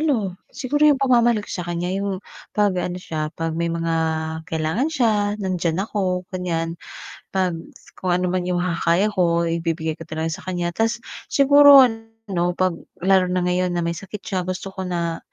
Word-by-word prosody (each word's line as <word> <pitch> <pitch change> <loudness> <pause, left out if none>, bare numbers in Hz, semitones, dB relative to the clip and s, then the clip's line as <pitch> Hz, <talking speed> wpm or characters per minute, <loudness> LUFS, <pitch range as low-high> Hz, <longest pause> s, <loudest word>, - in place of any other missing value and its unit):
Ano, 235 - +1 0.2
siguro 290 +3 +2
yung 290 - +5
pagmamahal 240 -5 +3
ko - - -12
sa 180 - -3
kaniya 175 +3 -2
yung 200 -1 -3 0.3
'pag 205 -2 +3
ano 180 0 -3
siya, 155 -4 -4
'pag 165 0 -2
may 170 +1 -1
mga 165 0 -1 0.6
kailangan 160 - 0
siya 260 -8 +2 0.3
nandiyan 180 -4 -1
ako, 185 -4 -1
ganiyan. 165 -2 -2 0.6
'Pag 185 -2 +2 0.5
kung 180 -1 +1
ano 180 0 0
man 180 -1 -1
yung 175 -1 0
makakaya 180 +3 +1
ko, 170 -3 +2
ibibigay 165 -1 -2
ko 165 - -9
talaga 160 0 -3
sa 185 +3 -7
kaniya. 175 -1 -1
Ta’s 225 +5 -1 0.2
siguro 285 -1 +8
ano, 225 -6 -2
'pag 185 0 +2 0.3
lalo 190 -1 +4
na 180 0 0
ngayon 180 0 0
na 170 - 0
may 170 - 0
sakit 195 +4 -8
siya, 185 -3 -3
gusto 185 +1 -4
ko 190 -1 -5
na 170 -2 -2
180 Hz, 175 wpm, -22 LUFS, 170-210 Hz, 0.6 s, siguro